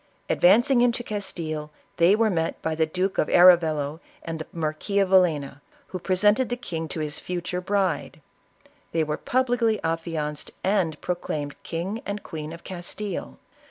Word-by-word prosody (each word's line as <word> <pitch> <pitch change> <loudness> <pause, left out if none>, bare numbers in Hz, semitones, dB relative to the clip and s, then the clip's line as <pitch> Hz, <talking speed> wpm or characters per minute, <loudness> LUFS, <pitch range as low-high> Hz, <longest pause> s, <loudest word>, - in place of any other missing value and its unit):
Advancing 240 +7 +5
into 240 0 +2
Castile, 165 -8 -4 0.3
they 170 +4 +5
were 220 -1 +2
met 165 -2 -1
by 160 - 0
the 160 0 +1
Duke 185 +4 -1
of - - +2
Arevalo 160 -4 +5 0.2
and 165 -1 -5
the 155 - -6
Marquis 160 +5 -2
of 195 -2 +3
Villena, 155 -7 +2 0.3
who 185 - -5
presented 205 +7 +2
the 245 - -2
king 165 -9 -4
to 160 - -4
his 150 -1 -4
future 180 0 -3
bride. 190 -5 -1 0.7
They 165 -1 +2
were 150 0 -2
publicly 245 -2 +1
affianced 165 -2 -2
and 185 -6 +1
proclaimed 150 -5 -3
King 185 +7 -4
and 200 0 -5
Queen 155 -1 -6
of 170 +1 -10
Castile. 190 +3 -5
175 Hz, 155 wpm, -25 LUFS, 155-200 Hz, 0.7 s, Advancing